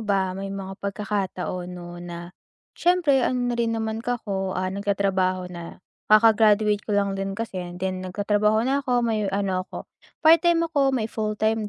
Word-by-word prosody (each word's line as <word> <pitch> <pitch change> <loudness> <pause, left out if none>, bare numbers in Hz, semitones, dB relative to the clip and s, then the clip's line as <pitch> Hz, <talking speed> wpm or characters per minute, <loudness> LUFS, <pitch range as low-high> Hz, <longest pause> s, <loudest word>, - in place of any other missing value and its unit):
ba, 195 -3 0
may 195 +1 -5
mga 195 -1 -6
pagkakataon 195 -3 -3
'no, 175 0 -9
na 175 0 -8 0.4
siyempre, 345 -6 +3
ano 245 -1 0
na - - -1
rin 230 -1 0
naman 220 0 -2
ako, 200 -6 -3
ah, 185 0 -1
nagtatrabaho 190 -2 0
na, 170 +1 -9 0.2
kaka-graduate 215 -1 +5
ko 210 -1 -2
lang 200 -1 +1
din 195 0 -3
kasi 220 -4 -4
and 175 0 -7
then 185 0 -3
nagtatrabaho 205 +4 +1
na 270 +2 +1
ako, 250 -3 +1
may 215 -3 0
ano 195 -1 0
ako, - - -7 0.4
part-time 335 +1 +5
ako, 280 -5 +1
may 225 - -1
fulltime 215 0 -1
205 Hz, 165 wpm, -24 LUFS, 190-225 Hz, 0.4 s, kaka-graduate